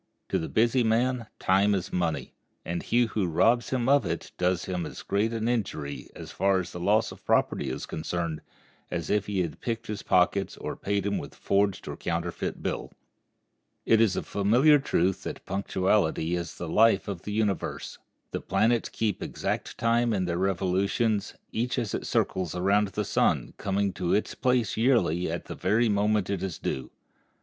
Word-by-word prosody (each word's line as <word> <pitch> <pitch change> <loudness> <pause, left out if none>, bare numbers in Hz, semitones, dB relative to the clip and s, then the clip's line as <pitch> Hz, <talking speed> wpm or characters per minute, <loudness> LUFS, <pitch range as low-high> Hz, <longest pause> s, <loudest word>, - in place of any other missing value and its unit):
To - - +1
the 80 - -4
busy 120 +3 +3
man 115 +1 +1
time 100 +2 +3
is 95 - -4
money, 85 -3 -1 0.3
and 85 0 -2
he 120 +1 +2
who 105 -4 -1
robs 115 +9 +3
him 125 -2 0
of 140 +1 +5
it 85 0 -4
does 90 -1 +1
him 90 -2 -2
as - - -9
great 105 +3 0
an 115 -1 -2
injury, 95 -12 -2
as - - -8
far 95 -1 +2
as 90 - -9
loss 100 +5 +2
of - - -13
property - - +1
is - - -4
concerned, 85 -1 -3 0.5
as - - -3
if 105 -1 +1
he 100 -2 0
had 85 - -6
picked 115 -1 -3
his 105 -2 -4
pockets 95 +2 +2
or - - -5
paid 100 -1 -1
him 100 0 0
with - - -8
a - - -19
forged 100 -1 +1
or - - -4
counterfeit 85 0 -3
bill. - - -3 0.9
It 115 0 +5
is 105 -5 +3
a - - -2
familiar 125 +9 +4
truth 95 -7 +1
that - - -7
punctuality 95 -3 +1
is 85 -1 -4
the 85 - -5
life 110 +4 +4
of 95 -4 -4
the 105 - -6
universe. 105 -3 -2 0.3
The - - -3
planets 115 +1 +1
keep 105 -4 -1
exact - - -3
time 115 0 +2
in 95 -3 0
their 85 0 -1
revolutions, 95 +3 0 0.2
each 120 +3 -1
as 115 -5 -2
it - - -3
circles 90 -3 0
around 100 +3 +3
the 100 - -3
sun - - +1
coming 100 0 0
to 90 -2 0
its 105 - -1
place 125 -5 +1
yearly 110 -8 +2
at - - -4
the - - -6
very 110 +5 +2
moment 105 -1 +1
it 95 -3 -2
is 95 -4 -3
due. 65 - -3
100 Hz, 185 wpm, -27 LUFS, 90-115 Hz, 0.9 s, of